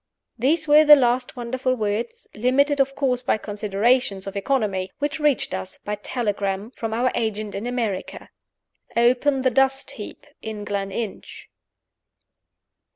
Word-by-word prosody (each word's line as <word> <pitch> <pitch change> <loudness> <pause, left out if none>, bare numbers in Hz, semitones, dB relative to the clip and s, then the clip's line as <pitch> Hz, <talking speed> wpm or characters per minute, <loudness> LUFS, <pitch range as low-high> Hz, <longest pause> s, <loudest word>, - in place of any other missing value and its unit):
These 305 +6 +1
were 300 +1 +7
the 300 -1 +10
last 250 -2 +1
wonderful 255 +1 -1
words 215 +1 -3
limited 275 +5 +2
of 275 0 +1
course 255 -3 0
by 250 - +1
considerations 210 +1 0
of 195 - -7
economy 200 -4 -1
which 295 +2 -2
reached 295 -9 +1
us 190 0 -5
(by 210 - -5
telegram) 205 -1 -3
from 225 -3 -5
our 245 +3 +1
agent 215 -2 -2
in 210 +4 -4
America: 230 -6 -3 0.7
"Open 255 +3 +3
the 260 - +3
dust 270 +2 +2
heap - - -9 0.2
at 215 -2 -6
Gleninch." 200 +1 -5
240 Hz, 135 wpm, -23 LUFS, 205-265 Hz, 0.7 s, the